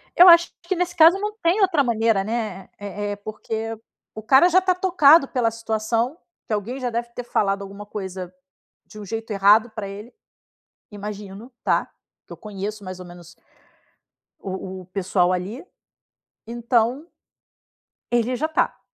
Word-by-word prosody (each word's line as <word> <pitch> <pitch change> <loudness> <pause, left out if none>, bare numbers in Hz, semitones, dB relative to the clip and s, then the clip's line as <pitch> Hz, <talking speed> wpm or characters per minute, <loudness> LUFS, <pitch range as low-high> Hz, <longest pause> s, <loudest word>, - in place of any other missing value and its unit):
Eu 355 - +8
acho 340 0 +6
que 350 +2 -2
nesse 350 0 -2
caso 335 +3 +7
não 420 +1 -2
tem 350 +5 +2
outra 350 -7 +3
maneira, 225 -4 +1
né, 215 -4 -4
eh 205 0 -5
eh, - - -5
porque 220 +2 -5 0.4
o 220 - -7
cara 265 +9 +5
já 365 +1 +5
está 370 -1 +1
tocado 340 -5 +5
pela 245 -4 0
situação, 225 +3 -2 0.3
que 220 - -2
alguém 230 +6 -3
já 250 - -2
deve 235 +1 -3
ter 245 - -5
falado 200 -4 0
alguma 200 +1 -9
coisa 190 -3 -6 0.5
de 215 - -13
um 205 - -8
jeito 225 +2 -5
errado 205 +4 +4
pra 215 -2 -6
ele. 205 +4 -9 0.8
Imagino, 205 +2 -8
tá, - - +1 0.4
que - - -12
eu - - -8
conheço 210 0 -6
mais 185 0 -7
ou 180 - -9
menos 175 -1 -13 1.1
o 190 -1 -6
o - - -14
pessoal 185 -1 +1
ali. 195 - -4 0.8
Então 240 +6 0 1.0
ele 240 +1 +1
já 310 - -1
está. 315 0 -1
225 Hz, 160 wpm, -22 LUFS, 200-265 Hz, 1.1 s, Eu